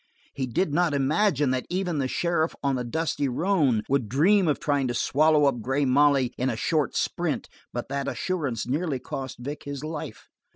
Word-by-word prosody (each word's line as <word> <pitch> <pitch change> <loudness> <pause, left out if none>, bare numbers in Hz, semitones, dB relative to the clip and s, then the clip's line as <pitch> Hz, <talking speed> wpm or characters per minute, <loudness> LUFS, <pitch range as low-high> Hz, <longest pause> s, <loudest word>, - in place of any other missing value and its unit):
He 130 -2 -3
did 145 +6 0
not 170 -2 +2
imagine 145 0 +2
that 130 -1 -2
even 180 -4 -1
the 135 - 0
sheriff 170 +2 0
on 140 -1 +2
the 125 -1 -1
dusty 145 +2 -1
roan 140 - +1
would 130 -6 0
dream 180 - +4
of 150 - +1
trying 145 -3 0
to 120 - -2
swallow 150 +3 +3
up 130 -4 +1
Grey 135 +5 0
Molly 135 -1 +3
in 130 +1 +1
a 120 - -1
short 150 +2 0
sprint - - -1 0.2
but 120 - -4
that 140 0 -2
assurance 140 - -2
nearly 145 +3 -1
cost 130 +1 -6
Vic 145 +5 -7
his 145 0 -5
life. 155 -1 -6
140 Hz, 190 wpm, -26 LUFS, 130-160 Hz, 0.2 s, dream